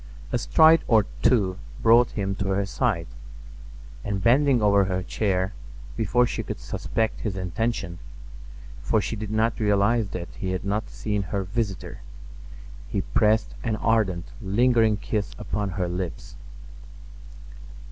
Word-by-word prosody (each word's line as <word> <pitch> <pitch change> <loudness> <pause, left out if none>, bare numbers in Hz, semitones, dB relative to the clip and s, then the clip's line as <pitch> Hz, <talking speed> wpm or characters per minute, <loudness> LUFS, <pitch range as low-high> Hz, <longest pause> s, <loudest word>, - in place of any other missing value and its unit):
A - - +1
stride 160 +5 +5
or 110 -4 +4 0.2
two 95 -7 +2 0.2
brought 115 +1 +5
him 100 -2 -2
to 100 - -2
her 100 +1 +1
side, 100 -5 -1 1.0
and 100 -2 -3
bending 130 +2 +4
over 100 -2 +4
her 95 -1 -2
chair—before 95 - -1
she - - -3
could - - -6
suspect 110 -1 -2
his 100 -4 -3
intention, 95 -1 -2 0.8
for 110 - +1
she 110 - -3
did 110 -1 -5
not 110 +2 0
realize 105 +1 +2
that 85 -2 -6
he 95 -1 -4
had 95 - -4
not 105 +2 -2
seen 105 -2 -2
her 100 +1 -3
visitor—he - - -6
pressed 110 0 +3
an 115 -3 0
ardent, 105 -6 +1 0.2
lingering 110 +1 +3
kiss 105 0 -3
upon 100 +3 -3
her 90 -1 -2
lips. 90 -1 -5
100 Hz, 130 wpm, -25 LUFS, 95-115 Hz, 1.0 s, stride